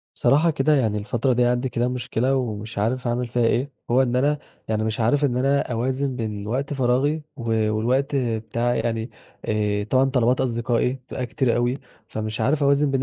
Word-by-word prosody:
بصراحة 155 +4 +3
كده 150 +1 +2
يعني 110 -6 +1
الفترة 120 +4 0
دي 125 0 +3
عندي 125 +2 +1
كده 120 0 0
مشكلة 125 +1 -1
ومش 110 -4 -3
عارف 125 +5 -1
اعمل 120 +1 -1
فيها 120 0 0
إيه، 130 +5 0 0.2
هو 125 +2 +5
إن 125 -1 0
أنا 145 +3 +2 0.3
يعني 110 0 0
مش 110 +1 -2
عارف 135 +6 +2
إن 125 -4 +1
أنا 135 0 +1
أوازن 130 +3 -1
بين 105 -4 -4
وقت 130 +6 -2
فراغي 135 +4 +1
و 120 - -7 0.3
والوقت 125 +7 0
بتاعي 120 0 -1
يعني، 115 0 -2 0.3
آآ 105 -1 0
طبعًا 130 +5 +3
طلبات 125 -1 +2
أصدقائي 120 0 0
بتبقى 130 -1 -6
كتير 120 0 0
أوي 120 +2 0 0.3
فمش 110 0 -4
عارف 145 +2 +1
أوازن 140 +1 +3
بين 135 -1 0
125 Hz, 185 wpm, -23 LUFS, 115-135 Hz, 0.3 s, هو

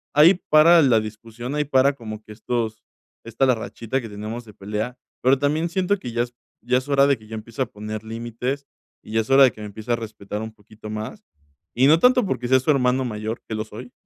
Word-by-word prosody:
Ahí 155 +5 +8 0.2
para 165 +3 +7
la 125 -6 +4
discusión, 115 +4 -7
ahí 150 0 0
para 135 0 +3
como 110 -5 -8
que 110 - -14
estos 110 0 -3 0.4
esta 115 +3 0
la 130 - +4
rachita 115 +3 -4
que 115 - -8
tenemos 110 +3 -6
de 105 - -14
pelea. 105 +5 -4 0.2
Pero 130 +2 +4
también 155 +4 +1
siento 190 +3 +1
que 120 - -6
ya 120 - +1
es 120 0 -9 0.3
ya 125 +2 +2
es 130 +2 -4
hora 140 -1 +5
de 140 -2 +3
que 110 - -17
ya 110 - -7
empiece 115 +3 -7
a - - +3
poner 110 -1 -7
límites 120 +5 -4 0.4
y - - -12
ya 110 - +3
es 110 - -9
hora 135 +1 +7
de 130 - +6
que 110 - -13
me 105 - -5
empiece 110 +3 -7
a - - +4
respetar 105 -2 -6
un 110 0 -6
poquito 105 0 -13
más, 110 - -6 0.5
y 130 +3 +4
no 160 +3 +6
tanto 250 0 +5
porque 125 -9 -2
sea 130 - +6
su 130 +4 +2
hermano 130 -1 +2
mayor, 110 0 -4
que 110 - -4
lo 110 - -2
soy, 120 +4 -10
120 Hz, 240 wpm, -23 LUFS, 110-135 Hz, 0.5 s, Ahí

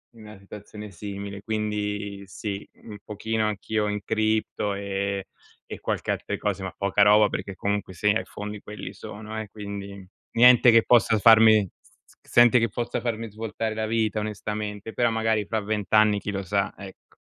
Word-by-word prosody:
in 115 - -14
una 105 -1 -11
situazione 105 +1 -10
simile. 100 +1 -7
Quindi 105 -2 -3
sì, 100 +1 -6 0.2
un 105 -2 -9
pochino 110 +1 -2
anch'io 105 +1 -1
in 105 0 -2
cripto 110 -2 0
e 100 0 -3 0.4
e - - -7
qualche - - -2
altre - - -3
cose 100 -2 -2
ma 95 -2 -4
poca 100 +1 +1
roba 105 +1 +6
perché 100 -1 -5
comunque 100 -1 -2
sia 105 +5 +2
i - - -5
fondi 105 0 -7
quelli 105 - -8
sono 110 +1 -7
eh, 105 - -9
quindi, 100 -2 -8 0.3
niente 125 +1 +7
che 115 -1 +6
possa 115 -2 +4
farmi 110 -1 +6
s - - -26 0.3
z - - -23
senti 120 0 +6
che 115 -1 +1
possa 120 +3 -3
farmi 115 -2 -3
svoltare 110 0 -4
la 110 0 -2
vita 110 -1 0
onestamente, 105 0 -5
però 120 -1 +2
magari 110 -2 0
fa 110 -1 -1
20 105 -1 -3
anni 105 -1 +5
chi - - -6
lo 100 0 -3
sa, 100 +1 0
ecco. 95 -1 -13
105 Hz, 175 wpm, -25 LUFS, 100-110 Hz, 0.4 s, niente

